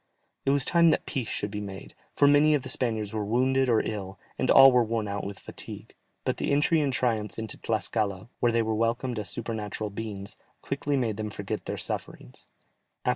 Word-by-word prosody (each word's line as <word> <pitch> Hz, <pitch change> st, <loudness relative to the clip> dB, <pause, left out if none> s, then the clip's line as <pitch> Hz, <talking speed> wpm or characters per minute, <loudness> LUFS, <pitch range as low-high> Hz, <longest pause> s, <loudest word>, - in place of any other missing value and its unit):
It -, -, +5 dB
was 140 Hz, -2 st, +4 dB
time 170 Hz, -1 st, +5 dB
that -, -, +1 dB
peace 130 Hz, -7 st, -3 dB
should 105 Hz, -2 st, -2 dB
be 105 Hz, 0 st, -4 dB
made, 100 Hz, -1 st, -8 dB, 0.2 s
for 145 Hz, -, +5 dB
many 145 Hz, +2 st, +5 dB
of 140 Hz, -, -1 dB
the 130 Hz, -, -6 dB
Spaniards 110 Hz, -4 st, -1 dB
were 110 Hz, -1 st, -1 dB
wounded 130 Hz, +4 st, +2 dB
or 115 Hz, -, +4 dB
ill, 100 Hz, -3 st, -5 dB, 0.2 s
and 130 Hz, -, 0 dB
all 135 Hz, 0 st, +9 dB
were 125 Hz, -1 st, +4 dB
worn 110 Hz, -1 st, -2 dB
out 100 Hz, 0 st, -3 dB
with 100 Hz, 0 st, -6 dB
fatigue, -, -, -8 dB, 0.3 s
but -, -, -1 dB
the -, -, -1 dB
entry 150 Hz, +3 st, +3 dB
in 145 Hz, -, +1 dB
triumph 115 Hz, -5 st, -1 dB
into 110 Hz, -1 st, -3 dB
Tlascala, 110 Hz, -3 st, -1 dB
where 120 Hz, -, +3 dB
they 115 Hz, 0 st, +2 dB
were 110 Hz, 0 st, -1 dB
welcomed 115 Hz, +2 st, 0 dB
as 105 Hz, -, -3 dB
supernatural 110 Hz, -2 st, -3 dB
beings, 100 Hz, -2 st, -6 dB, 0.3 s
quickly 140 Hz, +1 st, -1 dB
made 115 Hz, -5 st, -1 dB
them 110 Hz, -1 st, -3 dB
forget -, -, -5 dB
their -, -, -4 dB
sufferings. 60 Hz, -, -6 dB
115 Hz, 200 wpm, -27 LUFS, 105-130 Hz, 0.3 s, all